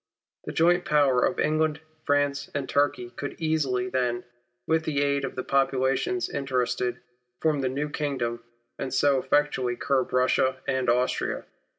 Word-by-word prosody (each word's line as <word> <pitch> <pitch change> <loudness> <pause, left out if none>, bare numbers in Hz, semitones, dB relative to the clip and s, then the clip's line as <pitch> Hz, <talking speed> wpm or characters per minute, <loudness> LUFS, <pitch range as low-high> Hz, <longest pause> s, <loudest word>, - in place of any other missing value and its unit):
The - - -4
joint 175 +2 +3
power 140 -4 +3
of 180 - 0
England, 155 0 +1 0.3
France, 145 0 +1
and 140 -2 -2
Turkey 140 -4 0
could 145 - -6
easily, 145 -6 0
then, 125 -1 -1 0.4
with 160 0 +1
the 145 -3 0
aid 140 -1 +1
of 135 - -4
the 130 - -3
populations 135 - +1
interested, 125 -2 -1 0.4
form 155 -3 +1
the 130 - 0
new 140 +3 -2
kingdom, 135 -6 -2 0.4
and 135 - -3
so 135 +1 +3
effectually 140 -4 +1
curb 135 +1 0
Russia 130 +1 +2
and 130 -2 0
Austria. 125 +1 0
135 Hz, 150 wpm, -26 LUFS, 125-145 Hz, 0.4 s, joint